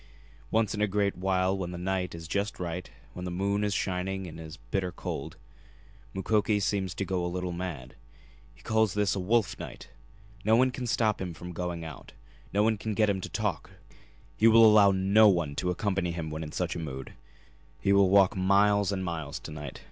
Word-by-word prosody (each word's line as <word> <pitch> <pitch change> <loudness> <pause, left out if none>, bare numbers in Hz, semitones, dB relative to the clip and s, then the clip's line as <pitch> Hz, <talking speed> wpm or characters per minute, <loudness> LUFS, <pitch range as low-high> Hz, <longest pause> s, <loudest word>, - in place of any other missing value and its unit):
Once 110 -2 +1
in 105 - -3
a 105 - +3
great 100 0 0
while 95 +1 +1
when 95 -3 -4
the 90 - -6
night 90 -1 -2
is 80 -1 -8
just 100 +4 -2
right, 90 0 -4 0.2
when 90 - -7
the 90 - -3
moon 100 +3 0
is 105 - 0
shining 95 0 -2
and 80 -2 -9
it - - -7
is 80 -1 -10
bitter 90 +10 -3
cold, 85 - -6 0.8
Mukoki 105 +2 +1
seems 95 -2 -1
to 100 - -2
go 95 -1 -1
a 90 - -1
little 90 0 -3
mad. 85 -8 -6 0.6
He - - -21
calls 110 -3 +1
this 105 -1 +2
a - - -2
'wolf 105 +2 +1
night.' - - -9 0.5
No 110 +2 +4
one 130 +2 +4
can 125 0 -5
stop 110 -3 +1
him 90 -3 -4
from 90 +2 -8
going 85 -1 -4
out; 80 -4 -10 0.4
no 105 +2 +2
one 110 -1 +1
can 110 -1 -3
get 105 -1 +3
him 95 -1 -3
to - - -6
talk; - - -2 0.7
he 110 - +4
will 115 0 +8
allow 105 -2 +7
no 100 +3 +5
one 85 -6 +1
to 90 - 0
accompany 95 0 -1
him 85 -2 -4
when 80 +1 -4
in 75 -1 -6
such 90 +1 -2
a - - -4
mood. 65 -5 -6 0.7
He 100 +11 +2
will 100 -1 +5
walk 95 -1 +5
miles 100 +1 +3
and 95 -2 -2
miles 80 -2 -4
to - - -8
night. 75 -3 -7
95 Hz, 210 wpm, -28 LUFS, 85-105 Hz, 0.8 s, will